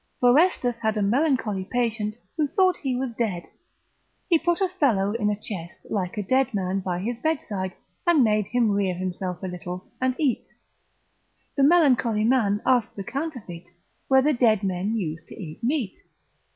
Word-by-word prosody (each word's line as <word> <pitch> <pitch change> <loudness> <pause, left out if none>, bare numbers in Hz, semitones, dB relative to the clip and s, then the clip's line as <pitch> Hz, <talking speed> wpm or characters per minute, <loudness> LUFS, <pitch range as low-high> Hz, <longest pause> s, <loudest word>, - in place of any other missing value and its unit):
Forestus, 245 -1 +5
obs. 345 +4 +4
lib. 245 -1 +1
1. 230 - -24
had 220 -1 0
a - - +1
melancholy 235 -4 +1
patient, 220 0 -1 0.2
who 310 -3 +1
thought 370 +4 +3
he 265 -3 -2
was 255 -1 -2
dead, 210 -7 -2 0.8
he 335 -4 +4
put 345 +1 +1
a 385 - +2
fellow 250 - +1
in 215 -2 0
a 205 0 -2
chest, 175 -6 -8
like 185 -2 -2
a 210 - -1
dead 260 +3 +1
man, 190 0 -1
by 185 -2 -2
his 230 +6 -3
bedside, 215 - -2 0.4
and 325 -6 +5
made 210 -2 +2
him 240 -3 +2
rear 200 -2 +1
himself 185 0 -4
a - - -2
little, 180 0 -7
and 255 0 +1
eat: 280 -7 0 1.1
the 280 - +1
melancholy 270 -8 +4
man 220 -4 +2
asked 245 -4 +2
the 195 - -5
counterfeit, 240 - -5 0.4
whether 265 +3 +4
dead 225 -5 +3
men 190 +3 -1
use 165 -5 -3
to - - -12
eat 165 +2 -8
meat? 250 -5 0
225 Hz, 180 wpm, -25 LUFS, 195-265 Hz, 1.1 s, Forestus